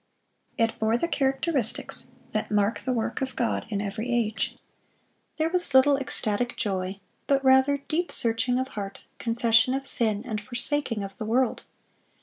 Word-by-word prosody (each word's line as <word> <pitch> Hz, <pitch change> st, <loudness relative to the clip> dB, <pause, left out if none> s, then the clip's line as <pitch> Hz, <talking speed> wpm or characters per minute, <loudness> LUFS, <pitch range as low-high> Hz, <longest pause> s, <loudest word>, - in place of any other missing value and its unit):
It 230 Hz, -1 st, +1 dB
bore 220 Hz, +1 st, +2 dB
the 335 Hz, -, 0 dB
characteristics 270 Hz, -3 st, 0 dB, 0.2 s
that 215 Hz, -, -2 dB
mark 210 Hz, +1 st, +1 dB
the 260 Hz, -, -2 dB
work 235 Hz, +3 st, -2 dB
of 265 Hz, -1 st, -3 dB
God 235 Hz, -1 st, -1 dB
in 205 Hz, -3 st, -2 dB
every 210 Hz, +4 st, -4 dB
age. 225 Hz, -3 st, 0 dB, 0.8 s
There 315 Hz, 0 st, +2 dB
was 355 Hz, -6 st, +1 dB
little 280 Hz, +2 st, +7 dB
ecstatic 245 Hz, -3 st, -1 dB
joy, 190 Hz, -1 st, -2 dB, 0.3 s
but 275 Hz, -1 st, +2 dB
rather 265 Hz, +2 st, +5 dB
deep 345 Hz, +3 st, -1 dB
searching 235 Hz, +2 st, +1 dB
of 260 Hz, +1 st, -1 dB
heart, 200 Hz, -4 st, -6 dB, 0.2 s
confession 230 Hz, +1 st, +3 dB
of 270 Hz, 0 st, -3 dB
sin, 215 Hz, -5 st, +2 dB
and 215 Hz, -3 st, -3 dB
forsaking 245 Hz, 0 st, -2 dB
of 195 Hz, 0 st, -8 dB
the 215 Hz, -, -3 dB
world. 245 Hz, +3 st, +1 dB
240 Hz, 155 wpm, -26 LUFS, 215-265 Hz, 0.8 s, little